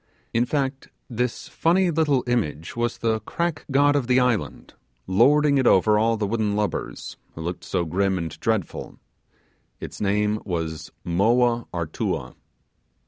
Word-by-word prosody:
In 115 +1 +2
fact, 135 -1 -2 0.2
this 125 +1 -2
funny 175 +2 +2
little 150 -5 +2
image 95 -11 -2
was 120 0 -1
the 110 -1 0
'crack' 170 +8 -3
god 145 +1 +4
of 135 -4 0
the 130 0 +4
island; 125 -5 -1 0.3
lording 140 +9 +4
it 130 - +2
over 105 +3 +4
all 115 +1 +2
the 105 - -1
wooden 105 -1 0
lubbers 105 -1 -3 0.2
who 80 - -7
looked 85 +2 -4
so 90 -2 -1
grim 95 +3 0
and 85 -2 -5
dreadful; 110 -5 -2 0.8
its - - -8
name 105 +1 +1
was 80 -5 -4
Moa 115 +6 +2
Artua*. 85 -3 -3
115 Hz, 140 wpm, -24 LUFS, 95-130 Hz, 0.8 s, god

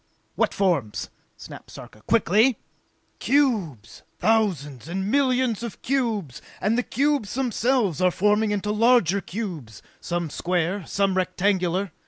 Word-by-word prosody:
"What - - +1
forms?" 165 - -1 0.3
snapped - - -11
Sarka. 105 - -12
"Quickly!" 225 +2 +3 0.6
"Cubes! 210 - 0 0.2
Thousands 165 - 0
and 190 +4 -3
millions 255 -5 +1
of 235 -3 -6
cubes, 225 - -1 0.2
and 210 +4 +1
the 245 - +2
cubes 275 -4 -1
themselves 240 - 0
are 185 - +5
forming 210 +4 +2
into 205 0 -1
larger 215 -4 +3
cubes, 170 - -7 0.2
some 175 -3 -3
square, 180 +2 -1
some 195 -1 0
rectangular! 185 0 0
200 Hz, 120 wpm, -24 LUFS, 175-230 Hz, 0.6 s, are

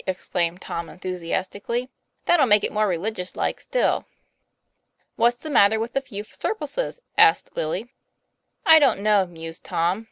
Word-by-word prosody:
exclaimed 180 -2 -1
Tom, 170 -2 -5
enthusi 180 -2 -6
astically. 205 +6 -2 0.4
"That'll 330 -6 +4
make 210 -1 +5
it - - -1
more 215 0 +1
religious 185 +1 -3
like, - - -1
still." - - 0 1.1
"What's 240 +1 +3
the 310 +4 -7
matter 220 -4 +5
with 230 +2 -4
a 275 - +2
few 210 -6 -7
surplices?" 435 - -4 0.2
asked 425 -1 +5
Willie. 195 +11 -3 0.7
"I 320 -1 +9
don't 270 -9 +3
know," 205 -2 +3
mused 165 -1 -9
Tom. 175 +4 0
210 Hz, 150 wpm, -23 LUFS, 180-255 Hz, 1.1 s, I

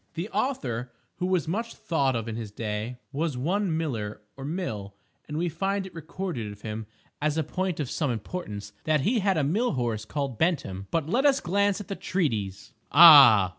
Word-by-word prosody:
The 175 +5 -4
author 125 - -2 0.3
(who 180 - -1
was 180 -5 +1
much 225 +7 -3
thought 140 -6 0
of 115 -1 -3
in 115 - -4
his 115 -2 -5
day) 105 +3 -4
was 150 -1 -2
one 175 +5 0
Miller, 115 -11 -3
or 135 - -9
Mill; 125 - -4 0.3
and 150 - -4
we 175 +2 0
find 195 +4 -1
it 190 - -10
recorded 165 - -5
of 105 0 -13
him, 110 0 -5 0.3
as 150 +1 0
a 160 - +2
point 180 +3 -2
of 145 - -1
some 150 +3 -1
importance, 105 - -5
that 155 -2 +2
he 225 - +2
had 195 -3 +1
a 155 - +2
mill 210 - +1
horse 120 -5 -1
called 135 -2 -3
Bentham. 125 - 0
But 160 -3 -1
let 255 - +3
us 275 -1 +3
glance 200 +3 +1
at 205 - -8
the 195 - -4
treatise! 110 - -2 0.2
Ah! 140 - +9
150 Hz, 195 wpm, -27 LUFS, 115-180 Hz, 0.3 s, Ah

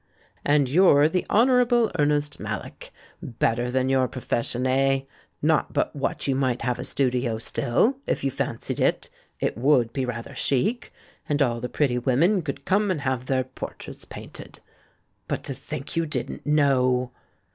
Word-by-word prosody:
"And 145 -2 +3
you're 150 -1 +5
the 175 +2 -1
Honourable 240 0 +4
Ernest 145 0 +1
Mallock. - - -6 0.3
Better 120 +1 -1
than 130 +1 0
your 130 -1 +2
profession, 125 0 -2
eh? 135 +1 +2 0.4
Not - - +2
but - - 0
what - - -2
you 135 - +2
might 130 -3 0
have 125 0 -1
a - - -3
studio 125 -4 0
still, 120 - +1
if - - -1
you 135 - +1
fancied - - -3
it. - - 0 0.3
It - - -2
would 125 -3 +3
be 135 - -1
rather 120 -1 -5
chic. 210 - 0 0.4
And 145 -1 +1
all 120 -5 +1
the 125 - -4
pretty 130 -5 +1
women 160 - +2
could 145 -4 -6
come 205 +2 +2
and 175 -6 -1
have 130 -2 -2
their 130 -1 +1
portraits 130 - -9
painted. - - -10 0.7
But, - - -3
to 135 - -4
think 135 +1 -7
you 165 -1 0
didn't 150 - -5
know!" 130 -4 +2
135 Hz, 160 wpm, -25 LUFS, 125-150 Hz, 0.7 s, you're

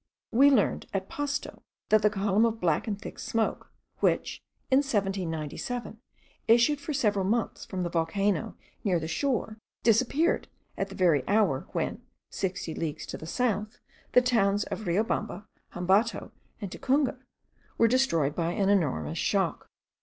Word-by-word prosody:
We 275 +5 +6
learned, 250 -8 +2
at 190 0 -2
Pasto, 290 0 -4 0.3
that 215 -1 +5
the 210 - +4
column 205 +1 +1
of 225 -1 +1
black 165 +2 +1
and 205 -2 -2
thick - - -9
smoke, 225 -4 -2 0.3
which, - - 0 0.3
in 260 - +6
1797, 200 - -2 0.5
issued 240 +6 +4
for 305 - -4
several 210 -9 +1
months 225 +4 -1
from 185 -2 -3
the 175 - -2
volcano 170 +2 0 0.3
near 185 -5 +2
that 160 - -4
shore, 240 - -1 0.2
disappeared 255 +8 +2 0.3
at 195 - -2
the 195 - -9
very 170 -8 +3
hour, 200 -10 +2
when, - - -2 0.3
sixty 180 -3 -3
leagues 155 -2 -4
to - - -6
the 160 - -8
south, 215 +1 -1 0.4
the 250 - +6
towns 205 -5 +2
of 215 - -6
Riobamba, 210 +2 -1 0.3
Hambato, 195 +6 +1 0.3
and 200 -5 -6
Tacunga 265 -1 0 0.6
were 230 - +5
destroyed 195 - +2
by 170 +1 -1
an 195 +1 +1
enormous 145 - +1
shock. - - 0
205 Hz, 145 wpm, -28 LUFS, 180-235 Hz, 0.6 s, We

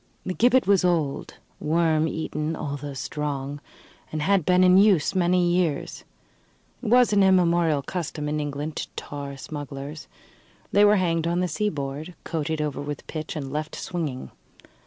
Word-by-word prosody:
The 185 - -2
gibbet 250 +4 +4
was 195 -1 +4
old, 165 -6 0 0.2
worm 160 0 +2
eaten, 160 0 -3
although 145 -1 -5
strong, 145 -2 -4 0.5
and 155 -1 -2
had 195 -1 +2
been 180 0 +5
in 185 +1 +7
use 195 -5 +4
many 180 -1 +2
years. 170 -5 -1 0.8
It - - -5
was 245 -1 +5
an 200 - +5
immemorial 170 -5 +3
custom 155 -4 -4
in 150 +1 -1
England 145 +1 -4
to - - -3
tar 140 -1 -6
smugglers. 145 0 -7 0.6
They 205 - +5
were 210 0 +6
hanged 170 -4 +1
on 170 +1 0
the 180 - +1
seaboard, 155 -4 -3
coated 160 -1 -2
over 150 -2 -3
with 145 0 -6
pitch 155 0 -5
and 140 -3 -5
left 155 +1 -3
swinging. 155 -8 -4
160 Hz, 155 wpm, -25 LUFS, 145-180 Hz, 0.8 s, in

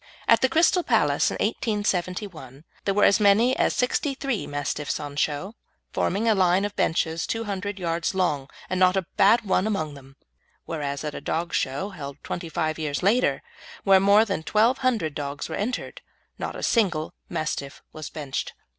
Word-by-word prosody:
At - - +5
the 260 - +3
Crystal 330 +5 +4
Palace - - +2
in - - -4
1871 180 - -2 0.2
there 195 - +2
were 205 - +3
as 200 - +5
many 215 +5 +4
as - - +1
sixty 270 +3 0
three 270 -5 -2
Mastiffs 145 0 -3
on 145 -1 -6
show, 150 +8 -1 0.4
forming 205 +5 0
a 225 - +5
line 185 0 +3
of 205 - -5
benches 160 0 0
two 225 0 -2
hundred 200 -1 -4
yards 170 0 -1
long, 145 -7 0 0.2
and 185 - -2
not 185 0 +4
a 190 - 0
bad 220 +5 +5
one 190 +1 +2
among 160 -8 -2
them; 135 -1 -14 0.5
whereas 145 -3 -3
at 150 -1 -4
a - - -6
dog 170 +1 -2
show 140 +9 -1
held 140 -8 -8
twenty 170 -1 -5
five 155 0 -2
years 150 0 -2
later, 230 +7 +2 0.4
where 195 -1 +6
more 200 +3 +5
than 195 -6 -2
twelve 220 +9 +2
hundred 230 - 0
dogs 145 -1 -4
were - - -4
entered, 235 +5 -3 0.4
not - - -4
a - - -6
single 175 -9 +1 0.2
Mastiff 155 -4 -4
was 155 -1 -7
benched. 145 -4 -4
185 Hz, 180 wpm, -25 LUFS, 155-210 Hz, 0.5 s, where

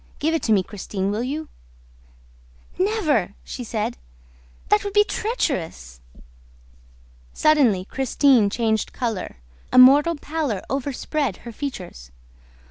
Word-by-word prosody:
Give 320 +2 0
it 325 - 0
to 225 - 0
me, 200 -3 +4
Christine, 195 -1 -4
will 210 +2 -2
you?" 295 +5 -4 1.3
"Never!" 320 - +1
she 250 - -7
said. 220 - -3 0.7
"That 420 0 +3
would 405 -1 -4
be 415 0 +6
treacherous!" 175 - -3 1.3
Suddenly 255 -12 +3
Christine 265 -3 +3
changed 220 0 -1
color. 225 - -4 0.3
A - - +1
mortal 285 +6 +7
pallor 290 -9 -3
overspread 275 - -2
her 235 - -6
features. 185 - -7
255 Hz, 115 wpm, -22 LUFS, 205-305 Hz, 1.3 s, mortal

